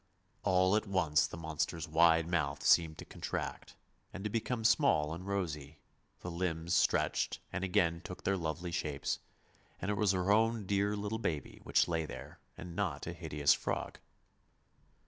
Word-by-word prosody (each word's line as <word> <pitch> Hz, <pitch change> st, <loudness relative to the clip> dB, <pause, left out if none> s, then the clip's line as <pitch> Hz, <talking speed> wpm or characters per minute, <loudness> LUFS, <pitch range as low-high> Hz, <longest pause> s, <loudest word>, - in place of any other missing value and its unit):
All 95 Hz, 0 st, +3 dB
at 110 Hz, 0 st, 0 dB
once 85 Hz, -6 st, +2 dB
the -, -, -8 dB
monster's 80 Hz, +1 st, -3 dB
wide 80 Hz, +1 st, +4 dB
mouth 75 Hz, -5 st, -1 dB
seemed 80 Hz, -2 st, +4 dB
to -, -, -8 dB
contract, -, -, -5 dB, 0.4 s
and 95 Hz, -, -7 dB
to 105 Hz, -, -2 dB
become 115 Hz, +1 st, -1 dB
small 110 Hz, -, +3 dB
and 90 Hz, +3 st, -7 dB
rosy, 80 Hz, -7 st, -3 dB, 0.4 s
the 90 Hz, -, -5 dB
limbs 85 Hz, -1 st, -2 dB
stretched -, -, +2 dB
and 95 Hz, 0 st, -2 dB
again 85 Hz, -3 st, +2 dB
took 90 Hz, -, -8 dB
their 100 Hz, -, +2 dB
lovely 85 Hz, 0 st, -3 dB
shapes, 75 Hz, -5 st, -2 dB, 0.6 s
and 100 Hz, -, -2 dB
it 105 Hz, -, -1 dB
was 100 Hz, -2 st, +3 dB
her 90 Hz, +1 st, +1 dB
own 110 Hz, 0 st, +3 dB
dear 100 Hz, +1 st, +1 dB
little 105 Hz, +2 st, -3 dB
baby 75 Hz, -, -3 dB
which -, -, +3 dB
lay 80 Hz, -2 st, -1 dB
there, -, -, -9 dB, 0.2 s
and 85 Hz, 0 st, -8 dB
not 100 Hz, -3 st, -2 dB
a 85 Hz, -, -4 dB
hideous 75 Hz, -4 st, +2 dB
frog. -, -, -3 dB
85 Hz, 165 wpm, -33 LUFS, 80-100 Hz, 0.6 s, wide